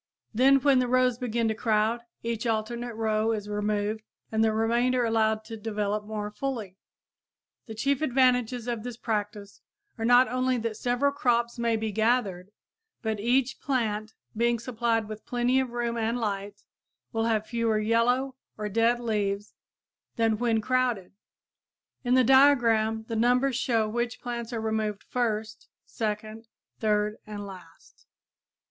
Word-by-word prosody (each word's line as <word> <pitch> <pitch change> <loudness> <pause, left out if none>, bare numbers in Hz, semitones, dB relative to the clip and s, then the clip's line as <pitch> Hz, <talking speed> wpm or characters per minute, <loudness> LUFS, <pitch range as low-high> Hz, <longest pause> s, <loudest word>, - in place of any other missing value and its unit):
Then 260 +5 +5
when 275 -1 +4
the 250 - +1
rows 250 -1 +2
begin 235 -2 0
to - - +1
crowd, 220 +1 +1 0.2
each 230 0 -2
alternate 235 +1 -2
row 220 0 +1
is 210 -2 -4
removed 210 +1 -1 0.3
and 220 0 +2
the 220 - +3
remainder 240 +3 +1
allowed 220 -1 +1
to 225 0 -7
develop 210 -1 -2
more 210 -1 -4
fully. 220 -6 -4 0.9
The 220 - -7
chief 275 +5 0
advantages 250 -4 +2
of 235 -2 -2
this 240 0 -7
practice 210 -3 -4 0.4
are - - -2
not 245 +2 +6
only 255 0 0
that 230 -1 -3
several 245 +5 +1
crops 240 -3 0
may 235 -1 +1
be 220 -1 -2
gathered, 210 -4 0 0.5
but 220 -2 -1
each 255 +4 +1
plant, 220 -5 -1 0.2
being 235 +1 +2
supplied 230 -2 -1
with 215 0 -8
plenty 245 +1 +1
of 260 -1 -1
room 235 0 -2
and 230 +2 0
light, 205 -2 -4 0.5
will 225 0 0
have 220 -2 +1
fewer 230 -2 0
yellow 240 +5 +1 0.2
or 210 0 -3
dead 230 +3 +2
leaves 205 -3 -2 0.6
than 225 -2 +1
when 230 -2 +1
crowded. 245 -5 0 0.9
In 250 0 +2
the 260 - +5
diagram 230 -5 +4
the 230 - -3
numbers 250 +3 +2
show 230 -4 +1
which 240 +2 -2
plants 235 -1 -5
are 230 -2 -3
removed 220 -2 -2
first, 220 -3 -2 0.2
second, 215 +1 -4 0.3
third 210 -1 +1
and 205 -1 -6
last. 180 -4 -14
225 Hz, 150 wpm, -27 LUFS, 215-245 Hz, 0.9 s, not